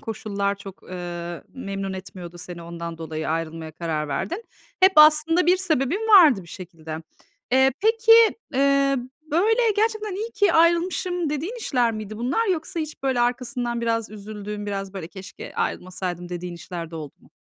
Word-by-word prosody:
koşullar 200 -2 -2
çok, 195 -1 -11
ıııı, 175 -1 -6
memnun 195 -6 -4
etmiyordu 180 -2 -9
seni, 175 -1 -8
ondan 170 0 -7
dolayı 160 -1 -4
ayrılmaya 165 0 -3
karar 155 -2 -3
verdin? 190 - -3 0.4
Hep 375 +1 +7
aslında 305 +3 +6
bir 360 +1 +5
sebebin 330 - 0
vardı 315 - +7
bir 170 - -16
şekilde. 165 -3 -8 0.5
Eee, 265 +1 +5
peki, 450 +2 +4 0.4
eee, 275 0 +3 0.3
böyle, 425 +10 +3 0.2
gerçekten 430 -2 0
iyi 440 +4 -4
ki 405 -4 +3
ayrılmışım 340 0 +2
dediğin 325 - -3
işler 245 - +1
miydi 215 -1 -6
bunlar? 265 - 0
Yoksa 340 -3 -1
hiç, 310 -3 -6
böyle, 265 -3 +1
arkasından 245 0 -1
biraz 230 -2 -1
üzüldüğün, 210 0 -7
biraz, 195 -1 -4
böyle, 185 -4 -6
"Keşke 190 +1 -10
ayrılmasaydım." 180 -1 -3
dediğin 175 0 -5
işler 170 -1 -7
de 165 - -7
oldu 150 -3 -8
mu? - - -22
215 Hz, 155 wpm, -24 LUFS, -, 0.5 s, Hep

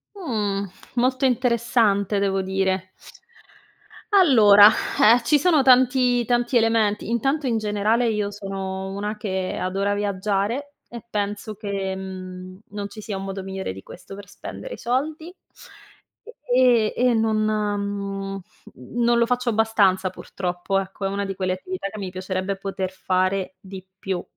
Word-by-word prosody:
Mh, 210 - -2 0.2
molto 255 +2 +1
interessante 235 -5 +2
devo 195 -1 +1
dire. 190 0 -1 1.3
Allora, 215 - +8 0.5
eh, 245 - -6
ci 290 +5 +3
sono 315 -4 +3
tanti 250 -1 +4
tanti 240 +1 0
elementi. 225 -2 +1
Intanto 270 +5 0
in 230 -2 +1
generale 215 +3 +1
io 210 -2 -1
sono 195 -1 -5
una 210 +2 -4
che 190 -3 -3
adora 195 +2 -1
viaggiare 205 +7 -2
e 235 -2 -9
penso 205 +1 -3
che, 200 -2 -3
mhmm, 185 -1 -8
non 205 0 -5
ci 215 +2 -10
sia 205 -2 -5
un 195 - -5
modo 195 0 -5
migliore 190 - -5
di 95 - -10
questo - - -12
per 200 0 -10
spendere - - -8
i - - -16
soldi. 310 +7 -2 1.2
E 245 -4 +4
e 250 0 +3
non 220 -1 +1
mhmm, 200 -2 -2 0.5
non 240 0 +2
lo 235 - +4
faccio 250 +1 0
abbastanza 210 -4 +2
purtroppo, 180 +1 -3
ecco, 195 +1 -6
è - - 0
una 200 +1 -2
di 195 - -3
quelle 185 -1 -1
attività 365 - -5
che 215 - -9
mi 190 -2 -5
piacerebbe 185 +1 -3
poter 195 -1 -4
fare 185 0 -1
di 190 -1 -10
più. 190 -2 -3
205 Hz, 145 wpm, -23 LUFS, 195-235 Hz, 1.3 s, Allora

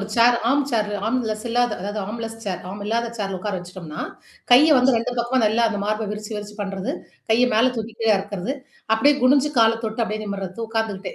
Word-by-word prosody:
ஒரு 200 - -4
chair 235 +1 +6
arm 285 +1 +3
chair 215 -3 +1 0.2
arm 255 +3 +1
less 215 0 -4
இல்லாத 245 -1 +2
அதாவது 205 +3 -4
ஆர்ம் 225 +4 -6
லெஸ் 225 0 -6
சேர் 190 -3 -3
ஆர்ம் 200 +2 -7
இல்லாத 230 +2 0
சேர்ல 195 -3 -3
உக்கார 205 +1 -3
வச்சுட்டோம்னா, 175 -3 -8 0.5
கைய 285 +6 +8
வந்து 255 0 +4
2 230 +2 -1
பக்கமும் 240 0 +1
நல்லா 220 +3 +2
அந்த 205 - -3
மார்ப 215 +1 -1
விரிச்சு 210 0 -7
விரிச்சு 210 0 -7
பண்றது, 195 -1 -3 0.4
கைய 240 +3 +5
மேல 250 +3 +4
தூக்கி 225 0 -5
கீழ 225 - +1
இறக்கறது, 200 +5 -4 0.4
அப்படியே 285 +7 +5
குணிஞ்சு 275 +3 +4
கால 225 0 +6
தொட்டு 220 +2 -2
அப்படியே 215 0 -4
நிமிர்றது, 195 0 -5
உக்காந்துக்கிட்டே. 220 -3 -3
220 Hz, 205 wpm, -22 LUFS, 205-235 Hz, 0.5 s, கைய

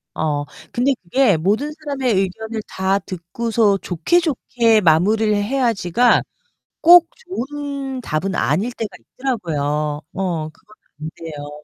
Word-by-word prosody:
어 145 -2 -1 0.3
근데 260 +3 +2
그게 200 +1 +3
'모든 210 - 0
사람의 280 -6 -2
의견을 220 +4 -2
다 190 +1 0
듣고서 200 +4 0
좋게 190 - +1
좋게 240 -8 +2
마무리를 205 +6 +3
해야지.'가 235 -1 +2 0.6
꼭 345 0 +8
좋은 280 -6 -5
답은 180 -1 -2
아닐 190 - 0
때가 225 -3 -4
있더라고요. 150 - -2
어 170 -5 -2
그건 215 +7 -22 0.3
안돼요. 150 -2 -8
210 Hz, 255 characters per minute, -20 LUFS, 170-260 Hz, 0.6 s, 꼭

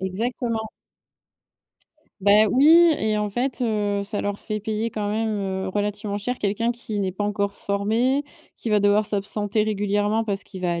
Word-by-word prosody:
exactement. 220 +3 -2 1.5
Bah 205 +2 +5
oui 270 +6 +4 0.3
et 215 0 0
en 210 -1 -1
fait, 250 +4 -2
heu, 205 -3 0
ça 205 +1 -2
leur 205 0 -3
fait 215 -1 -3
payer 220 +2 -2
quand 210 -1 -3
même, 220 +2 -1 0.4
heu, - - -3
relativement 205 +1 -2
cher 245 +5 -3
quelqu'un 220 +4 0
qui 225 -3 -5
n'est 190 -2 -1
pas 205 - -4
encore 200 -1 -1
formé, 225 +9 0 0.3
qui 230 - -4
va 210 -1 +4
devoir 205 +1 +3
s'absenter 205 +1 0
régulièrement 205 +1 0
parce 200 -2 -2
qu'il 190 -2 -10
va 175 -1 +1
à 170 - -2
210 Hz, 170 wpm, -23 LUFS, 200-220 Hz, 1.5 s, Bah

